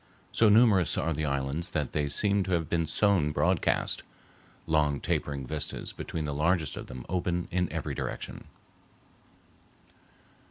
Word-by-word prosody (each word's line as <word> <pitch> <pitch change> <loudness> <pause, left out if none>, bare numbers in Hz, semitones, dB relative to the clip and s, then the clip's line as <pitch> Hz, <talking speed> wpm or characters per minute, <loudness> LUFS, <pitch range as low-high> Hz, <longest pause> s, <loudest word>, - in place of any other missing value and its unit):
So 115 - +4
numerous 105 -5 +5
are 80 - 0
the 75 +1 -2
islands 70 +5 -1
that 75 -5 -2
they 75 -1 -1
seem 100 +6 +3
to 95 - -1
have 85 -3 0
been 85 -1 0
sown 85 -3 +2
broadcast; - - +1 0.6
long 75 -3 +2
tapering 70 -2 -2
vistas 75 +2 -3
between 80 -2 -4
the 75 - -3
largest 80 +2 +1
of - - -7
them 65 -1 -8
open 90 -1 -1
in 90 -1 0
every - - -3
direction. - - -5
80 Hz, 145 wpm, -29 LUFS, 75-90 Hz, 0.6 s, numerous